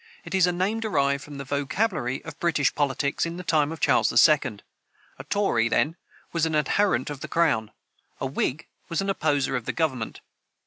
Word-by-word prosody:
It - - -7
is 185 -2 +4
a - - +2
name 190 +6 -1
derived 140 -10 0
from 145 0 -9
the 140 - -5
vocabulary 140 - -1
of - - -6
English 165 -5 +2
politics 140 -1 0
in 170 +1 -3
the 180 - -6
time 155 -3 +2
of 165 - -6
Charles - - +3 0.2
II. 145 -8 +1 0.6
A - - -6
tory, 120 - +1
then, 155 +7 +1 0.4
was 165 -1 +1
an 160 - -1
adherent 150 -2 +1
of 145 - -6
the - - -6
crown; 115 -11 +1 0.5
a - - -2
whig 135 +3 -2 0.2
was 165 +2 0
an 195 0 0
opposer 145 -7 0
of 125 -3 -3
the - - -2
government. 130 -9 -2
150 Hz, 190 wpm, -25 LUFS, 135-170 Hz, 0.6 s, is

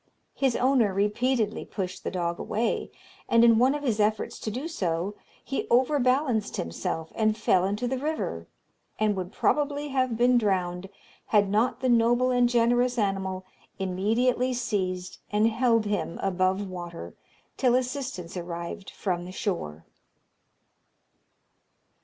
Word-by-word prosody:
His 265 -3 +1
owner 245 -7 +2
repeatedly 215 +2 0
pushed 185 -3 -5
the - - -2
dog 170 -2 -2
away, 225 +2 -1 0.4
and 230 0 +5
in 230 -1 +6
one 260 +4 +4
of 295 - -5
his 230 -6 0
efforts 210 0 0
to - - -4
do 255 +9 -4
so 185 - -2 0.3
he 270 - -3
overbalanced 255 -3 +2
himself 160 - -3
and 215 -1 +1
fell 185 -4 +3
into 205 +5 -1
the 260 +1 -2
river, 265 - -3 0.5
and 215 -1 +1
would 185 -1 -4
probably 290 +3 0
have 255 -4 0
been 245 +1 +4
drowned, 185 -3 -1 0.4
had 205 -2 +3
not 230 +3 +1
the 260 - +1
noble 240 +1 +3
and 245 -1 +3
generous 245 +1 +2
animal 190 -3 -1 0.3
immediately 225 +7 +1
seized 190 -6 -2
and 210 +2 +3
held 230 -1 +2
him 195 -6 -2
above 190 +1 +1
water 175 -2 -7 0.4
till 250 -2 +3
assistance 255 -9 -3
arrived 170 +2 -6
from 175 -3 -3
the 180 - -8
shore. 80 - -4
215 Hz, 135 wpm, -27 LUFS, 185-250 Hz, 0.5 s, in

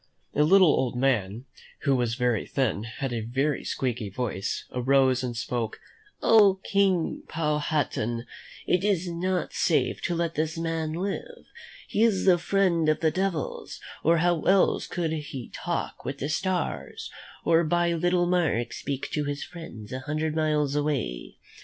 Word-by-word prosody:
A - - +2
little 185 +3 +6
old 130 -3 0
man, 120 -3 0 0.4
who 140 -2 +2
was 120 -2 0
very 120 -4 0
thin, 135 -2 +1
and 105 - -6
had 125 +2 -4
a 115 - -2
very 135 +6 -1
squeaky 120 -5 -2
voice, 100 -2 -3
arose 130 0 +3
and 120 -2 -3
spoke: 115 -1 -3 0.4
"Oh, 205 -4 +6
King 195 -4 +1
Powhatan, 150 -7 -1 0.4
it 180 +1 +2
is 190 -4 +1
not 180 0 -1
safe - - +1
to 175 - -1
let 170 -1 -1
this 160 +1 -1
man 165 -1 -2
live. 200 - -4 0.4
He 210 - -1
is 220 -5 +3
the 180 -2 +5
friend 170 -4 +2
of 155 - +1
the 160 -1 +3
devils, 185 -3 -3 0.2
or 165 +2 +4
how 175 -1 +2
else 195 0 +3
could 170 -3 -2
he 145 -5 -5
talk - - -3
with 135 +2 -4
the 140 +1 -3
stars, 185 +4 -2 0.3
or 165 0 +4
by 175 +1 +2
little 175 +1 +2
marks 165 -10 0
speak 140 -1 -3
to 150 -1 -1
his 145 0 -3
friends 120 -12 -10
a 130 - -3
hundred 155 +3 -2
miles 150 -3 +1
away? 145 - -2
155 Hz, 160 wpm, -27 LUFS, 130-175 Hz, 0.4 s, little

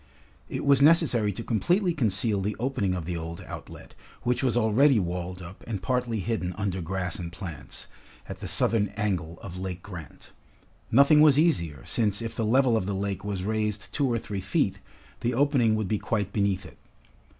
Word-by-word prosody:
It - - -3
was 140 -1 +5
necessary 140 -9 +5
to 115 - -6
completely 175 - +1
conceal 110 - +1
the 105 +2 -2
opening 120 -7 0
of 85 -3 -4
the 90 +1 -3
old 85 0 -5
outlet, - - -10 0.3
which 125 0 +1
was 125 -2 +2
already 120 +4 +4
walled 90 -1 -3
up 90 +3 -11
and 110 -4 -3
partly 125 -2 -1
hidden 90 -4 -2
under 95 -3 -2
grass 90 +1 -3
and 85 -1 -5
plants, 85 -4 -7 0.4
at - - -7
the - - -5
southern 105 -3 +2
angle 90 -6 -2
of 90 -2 -7
Lake 90 -2 -5
Grant. 85 -8 -10 0.6
Nothing 140 +5 +6
was 150 -3 +6
easier, 85 - +1
since 105 -3 +1
if 115 -1 -4
the 115 - -1
level 125 +1 +4
of 95 -4 0
the 100 - -1
lake 100 0 -3
was 100 -3 -3
raised 105 0 -2
two 140 -4 +1
or 120 - +1
three 105 -3 -4
feet, 95 - 0 0.4
the 120 0 -1
opening 130 -5 +3
would 110 -2 -1
be 105 +1 0
quite 105 -3 -2
beneath 100 -2 0
it. - - -13
105 Hz, 185 wpm, -27 LUFS, 95-120 Hz, 0.6 s, Nothing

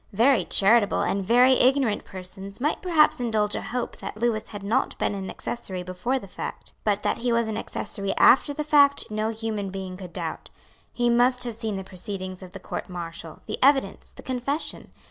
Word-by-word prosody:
Very 230 -1 +4
charitable 205 +1 +4
and 195 0 0
very 245 +6 +5
ignorant 255 -4 +2
persons 190 +2 -7
might 295 +5 0
perhaps 320 -7 +4
indulge 220 -4 0
a - - -2
hope 245 0 -4
that - - -7
Lewis 225 -1 0
had 205 -2 -8
not 230 +7 0
been - - 0
an 195 -1 -5
accessory 190 -6 -5
before 185 +9 -2
the 200 - -8
fact. - - -7
But 205 -1 0
that - - 0
he 240 +1 0
was 235 -1 +2
an 220 - -3
accessory 200 -2 -4
after 270 - +6
the 300 +1 -3
fact 285 -4 +4
no 215 +1 -1
human 220 -3 -3
being 190 -1 -6
could 185 -2 -9
doubt. 165 -3 -5 0.4
He 240 0 0
must 250 +1 +3
have 240 -2 -2
seen 220 -2 -3
the 190 - -4
proceedings 185 0 -6
of 185 0 -11
the 195 - -8
Court - - -6
Martial, 170 -2 -7
the - - -4
evidence, 270 -8 +2
the - - -13
confession. 260 +4 -3
215 Hz, 195 wpm, -25 LUFS, 195-250 Hz, 0.4 s, after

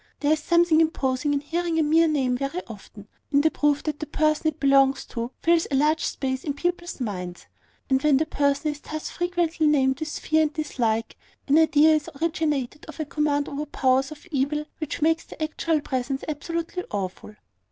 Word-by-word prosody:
There 290 +1 +2
is 310 - 0
something 340 0 +4
imposing 275 -3 0
in 285 -1 0
hearing 335 +2 -2
a 320 - +3
mere 325 +2 +4
name 270 -5 +1
very 275 +8 -3
often, 210 -2 -12 0.2
in 285 0 +4
the 315 +1 +3
proof 290 -1 +1
that 300 -2 -3
the 310 - -5
person 310 +1 +1
it 310 0 -2
belongs 275 -1 +4
to 235 0 -3
fills 335 0 +3
a 275 - 0
large 305 +3 +2
space 260 -1 -2
in 290 -3 -3
people's 350 +2 -3
minds: 180 -7 -5 0.4
and 265 0 +2
when 295 -2 +4
the 310 - +1
person 285 0 0
is 295 - -9
thus 310 +1 -6
frequently 345 -3 0
named 265 -3 +2
with 315 -1 -4
fear 315 0 +2
and 305 -1 0
dislike, 235 -8 -1 0.3
an 295 +3 +5
idea 315 0 +5
is 305 -1 0
originated 300 -5 -1
of - - -11
a 310 - -1
command 295 -1 0
over 295 +2 -4
powers 265 -1 +1
of 305 - -11
evil 295 +2 0
which 310 -1 -3
makes 325 +1 +2
the - - -13
actual 310 0 0
presence 265 -1 -3
absolutely 335 +4 -3
awful. 200 +1 -5
295 Hz, 195 wpm, -25 LUFS, 270-315 Hz, 0.4 s, an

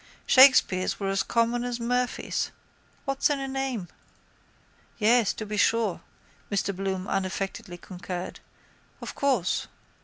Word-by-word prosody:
Shakespeares 255 -8 +5
were 195 -1 -1
as 195 -1 +1
common 235 +1 +1
as 245 -1 -2
Murphies. 245 +1 -1 0.6
What's 275 +1 +1
in 290 -1 0
a 270 - -3
name? 265 -8 -3 1.1
—Yes, 230 0 +4
to 215 - -6
be 210 0 -4
sure, 210 -5 +2 0.5
Mr 200 -1 0
Bloom 190 -1 -3
unaffectedly 190 -1 -3
concurred. 180 0 -7 0.6
Of - - -7
course. 260 - 0
215 Hz, 120 wpm, -27 LUFS, 190-250 Hz, 1.1 s, Shakespeares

